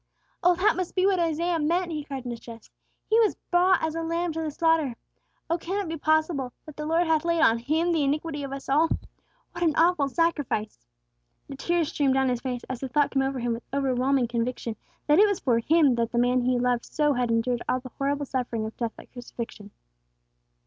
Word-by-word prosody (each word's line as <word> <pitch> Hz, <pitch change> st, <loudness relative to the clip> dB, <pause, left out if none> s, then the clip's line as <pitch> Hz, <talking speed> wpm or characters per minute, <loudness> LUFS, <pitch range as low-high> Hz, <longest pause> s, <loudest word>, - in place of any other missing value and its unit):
"Oh, 355 Hz, -1 st, +4 dB
that 400 Hz, +5 st, +3 dB
must 365 Hz, -2 st, -4 dB
be 370 Hz, 0 st, +3 dB
what 390 Hz, -2 st, +3 dB
Isaiah 335 Hz, +1 st, 0 dB
meant!" 340 Hz, +3 st, 0 dB
he 305 Hz, -2 st, -3 dB
cried 275 Hz, -3 st, -6 dB
in 245 Hz, -, -3 dB
distress. 230 Hz, -1 st, -10 dB, 0.4 s
"'He 445 Hz, -, +4 dB
was 440 Hz, -2 st, +3 dB, 0.2 s
brought 360 Hz, 0 st, +4 dB
as 320 Hz, -1 st, 0 dB
a 330 Hz, -, -3 dB
lamb 335 Hz, +1 st, -1 dB
to 325 Hz, -, -3 dB
the 315 Hz, -, -2 dB
slaughter!' 315 Hz, -4 st, +1 dB, 0.5 s
Oh, 335 Hz, +1 st, 0 dB
can 380 Hz, +5 st, -3 dB
it 400 Hz, -, -3 dB
be 325 Hz, -, -3 dB
possible 310 Hz, -4 st, 0 dB
that 310 Hz, -2 st, -11 dB
'the 300 Hz, 0 st, -5 dB
Lord 330 Hz, +2 st, +2 dB
hath 320 Hz, -1 st, +2 dB
laid 335 Hz, -1 st, +1 dB
on 230 Hz, -7 st, +4 dB
Him 315 Hz, +8 st, 0 dB
the 320 Hz, -3 st, +2 dB
iniquity 295 Hz, +2 st, -1 dB
of 275 Hz, -, -5 dB
us 275 Hz, 0 st, -7 dB
all'? 305 Hz, +4 st, +3 dB, 0.6 s
What 345 Hz, -, -4 dB
an 320 Hz, -3 st, +2 dB
awful 330 Hz, -4 st, +3 dB
sacrifice!" 275 Hz, -, -1 dB, 0.6 s
The 275 Hz, -, -6 dB
tears 335 Hz, +2 st, 0 dB
streamed 280 Hz, -5 st, +1 dB
down 265 Hz, -1 st, +2 dB
his 245 Hz, -1 st, -1 dB
face 250 Hz, -2 st, -4 dB
as 255 Hz, -2 st, -5 dB
the 265 Hz, -, -5 dB
thought 290 Hz, +2 st, +2 dB
came 270 Hz, -, +1 dB
over 270 Hz, 0 st, -1 dB
him 240 Hz, -1 st, -1 dB
with 230 Hz, -, -6 dB
overwhelming 265 Hz, -1 st, +1 dB
conviction, 235 Hz, -1 st, -3 dB, 0.3 s
that 300 Hz, +3 st, +4 dB
it 420 Hz, -, +7 dB
was 405 Hz, -2 st, -1 dB
for 240 Hz, -3 st, +2 dB
him 295 Hz, +2 st, +4 dB
that 235 Hz, -1 st, -1 dB
the 235 Hz, -, -2 dB
man 245 Hz, +1 st, +3 dB
he 250 Hz, 0 st, +1 dB
loved 245 Hz, -1 st, 0 dB
so 295 Hz, -2 st, +1 dB
had 245 Hz, -2 st, 0 dB
endured 235 Hz, +1 st, 0 dB
all 255 Hz, -, +2 dB
the 255 Hz, -1 st, -11 dB
horrible 285 Hz, +1 st, 0 dB
suffering 245 Hz, -4 st, -2 dB
of 220 Hz, -, -7 dB
death 235 Hz, -2 st, -3 dB
by -, -, -12 dB
crucifixion. 235 Hz, -4 st, -8 dB
285 Hz, 225 wpm, -26 LUFS, 250-330 Hz, 0.6 s, it